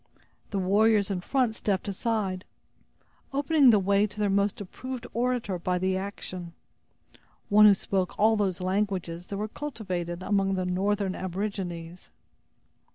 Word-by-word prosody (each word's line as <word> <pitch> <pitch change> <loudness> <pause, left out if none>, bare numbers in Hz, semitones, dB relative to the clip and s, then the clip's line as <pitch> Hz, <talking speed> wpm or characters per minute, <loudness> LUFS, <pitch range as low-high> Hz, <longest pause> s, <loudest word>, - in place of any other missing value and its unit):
The 200 - -3
warriors 205 +2 +3
in 185 -2 -2
front 250 +2 +1
stepped 205 -2 -1
aside, 200 -2 -2 0.9
opening 285 0 +4
the 220 - +6
way 200 +1 +2
to 210 - -15
their 205 -2 +1
most 200 0 +1
approved 250 +5 -7
orator 235 -6 -1
by 180 +1 0
the 185 +1 0
action; 185 -3 -6 1.0
one 210 0 +8
who 205 - +7
spoke 190 -1 -2
all 220 +1 +4
those 195 -3 -1
languages 185 -3 -2
that 200 - -5
were 210 +2 -2
cultivated 185 -10 -5
among 195 -1 +1
the 185 -1 -1
northern 195 +1 0
aborigines. 180 -3 -5
200 Hz, 140 wpm, -27 LUFS, 185-215 Hz, 1.0 s, one